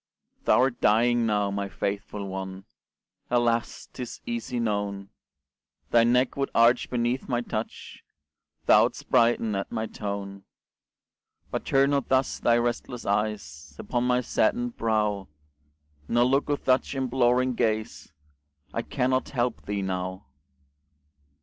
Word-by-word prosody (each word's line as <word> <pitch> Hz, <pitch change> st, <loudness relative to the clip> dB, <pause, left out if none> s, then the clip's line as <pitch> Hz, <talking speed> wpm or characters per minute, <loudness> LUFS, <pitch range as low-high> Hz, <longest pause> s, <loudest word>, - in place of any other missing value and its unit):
Thou'rt 130 Hz, -1 st, +3 dB
dying 115 Hz, +2 st, +3 dB
now, 105 Hz, -2 st, +1 dB
my 100 Hz, 0 st, -3 dB
faithful 100 Hz, +1 st, -4 dB
one, 95 Hz, 0 st, -6 dB, 0.6 s
Alas! 120 Hz, -1 st, 0 dB
'tis 125 Hz, -3 st, -7 dB
easy 235 Hz, -, -3 dB
known 100 Hz, -3 st, -2 dB, 0.8 s
Thy 115 Hz, -1 st, +6 dB
neck 125 Hz, +2 st, +2 dB
would 140 Hz, 0 st, -1 dB
arch 115 Hz, +2 st, +4 dB
beneath 120 Hz, +2 st, -1 dB
my 120 Hz, -2 st, +1 dB
touch, 110 Hz, -2 st, -6 dB, 0.6 s
Thou'dst -, -, +4 dB
brighten 115 Hz, -2 st, +3 dB
at 95 Hz, -, -3 dB
my 110 Hz, -, -2 dB
tone; 100 Hz, -2 st, -6 dB, 1.1 s
But -, -, -3 dB
turn 135 Hz, +1 st, +3 dB
not 140 Hz, -1 st, 0 dB
thus 130 Hz, 0 st, +1 dB
thy 120 Hz, 0 st, +3 dB
restless 120 Hz, 0 st, -2 dB
eyes 90 Hz, -8 st, -2 dB
Upon 120 Hz, -1 st, -2 dB
my 125 Hz, 0 st, +2 dB
saddened 245 Hz, -, 0 dB
brow, 105 Hz, -3 st, 0 dB, 0.8 s
Nor 120 Hz, +1 st, +3 dB
look 135 Hz, +3 st, +1 dB
with 145 Hz, -, -1 dB
such 130 Hz, +2 st, +2 dB
imploring 130 Hz, -1 st, +2 dB
gaze 110 Hz, -2 st, -2 dB, 0.6 s
I -, -, -1 dB
cannot 130 Hz, +1 st, 0 dB
help 120 Hz, -1 st, -2 dB
thee 100 Hz, -1 st, -2 dB
now. 95 Hz, -1 st, -4 dB
115 Hz, 125 wpm, -26 LUFS, 100-125 Hz, 1.1 s, Thy